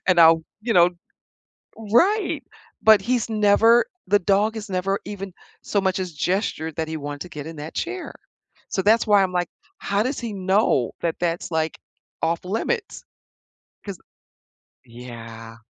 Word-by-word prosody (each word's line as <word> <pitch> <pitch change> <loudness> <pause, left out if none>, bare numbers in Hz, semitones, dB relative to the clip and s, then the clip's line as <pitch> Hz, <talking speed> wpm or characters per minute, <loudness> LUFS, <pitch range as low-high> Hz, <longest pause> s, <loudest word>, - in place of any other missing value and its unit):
and 185 -2 +4
I'll, 165 0 +7 0.2
you 230 +1 0
know 175 -2 +6 0.9
Right. 335 - +2 0.4
But 220 -2 +7
he's 240 +1 0
never 220 +2 +4 0.2
the 205 +2 +4
dog 200 +4 +2
has 220 -1 -7
never 195 +1 -1
even 195 -2 -7 0.3
so 205 - 0
much 190 -1 0
as 185 -2 -3
gestured 160 -1 -2
that 160 -1 -2
he 160 - -3
want 145 -1 -6
to 180 - -6
get 150 -2 -7
in 165 - -8
that 150 +2 -8
chair. 365 +1 -4 0.6
So 190 - -1
that's 220 +3 +4
why 205 -2 +5
I'm 185 - -1
like, 175 -1 0 0.3
"How 200 +2 0
does 265 +3 -2
he 235 -3 -5
know 190 - +1
that 165 -1 -1
that's, 175 -1 -2
like, 160 0 -1 0.4
off 165 +1 0
limits?" 335 - -3 0.8
'Cause 200 -4 -6 0.9
Yeah. 115 -1 -10
190 Hz, 155 wpm, -23 LUFS, 160-215 Hz, 0.9 s, I'll